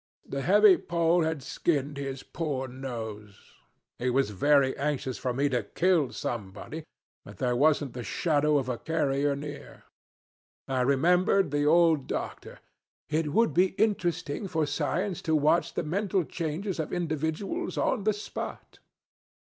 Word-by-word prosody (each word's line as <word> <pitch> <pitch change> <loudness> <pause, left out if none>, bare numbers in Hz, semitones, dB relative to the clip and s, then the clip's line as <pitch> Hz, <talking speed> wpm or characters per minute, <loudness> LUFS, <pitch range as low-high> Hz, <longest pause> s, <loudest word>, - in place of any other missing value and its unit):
The 140 - -4
heavy 200 +3 +6
pole 170 0 +2
had 160 -4 -1
skinned 145 0 -1
his 135 -1 -5
poor 145 -5 -3
nose. 110 -6 -7 0.6
He 125 - 0
was 130 -3 +1
very 140 +6 +3
anxious 140 -3 -2
for 125 - -1
me 135 +4 +1
to 125 -3 0
kill 165 - +1
somebody, 115 +8 -5 0.4
but - - -12
there 125 -2 0
wasn't 145 -1 +2
the 125 - -5
shadow 150 0 +1
of 135 -3 -1
a 125 -2 -3
carrier 145 -3 0
near. 145 +1 -8 0.8
I 130 -1 0
remembered 175 +6 +3
the 145 0 +1
old 165 -3 +4
doctor, - - -5 0.5
'It 155 0 0
would 230 +8 +3
be 185 +2 +3
interesting 180 -5 0
for 160 -4 0
science 170 +6 -2
to 160 - +1
watch 155 +3 +2
the - - -1
mental 190 +3 0
changes 170 +4 -4
of 160 - -3
individuals, 170 - -2
on 230 -6 +1
the 215 +1 +2
spot.' 205 - -7
150 Hz, 145 wpm, -28 LUFS, 135-175 Hz, 0.8 s, heavy